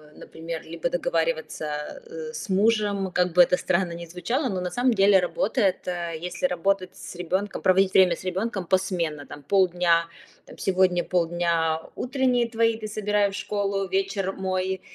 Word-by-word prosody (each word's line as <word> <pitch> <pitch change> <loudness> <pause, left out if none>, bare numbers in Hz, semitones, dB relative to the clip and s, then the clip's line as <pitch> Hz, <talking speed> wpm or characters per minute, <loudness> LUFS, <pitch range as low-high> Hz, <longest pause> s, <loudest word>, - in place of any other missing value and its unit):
например, 165 0 -7
либо 170 - -3
договариваться, - - -2
э, 470 0 -7
с 465 - -6
мужем, 200 -1 +1
как 180 -1 +1
бы 180 - +7
это 175 - +5
странно 185 -1 0
ни 170 0 -7
звучало, 210 - -2
но, 190 -3 -2
на 180 0 -3
самом 245 0 +2
деле, 195 -1 +5
работает, 195 +2 0
э, 170 -2 -3
если 180 +9 -3
работать 185 -3 0
с - - -10
ребенком, 185 +3 -2
проводить 190 +1 +3
время 185 -3 +5
с - - -12
ребенком 190 +1 -2
посменно. 175 -6 0
Там, 145 - -10
полдня 175 -1 +3 0.4
там, - - -14
сегодня 185 -2 +2
полдня 170 -2 0
утренние 250 -2 +1
твои, 230 0 +2
ты 215 -1 -6
собирай 210 -1 +1
в - - -11
школу, 200 -1 -2
вечер 195 0 -1
мой. 190 0 -2
190 Hz, 160 wpm, -25 LUFS, 175-210 Hz, 0.4 s, бы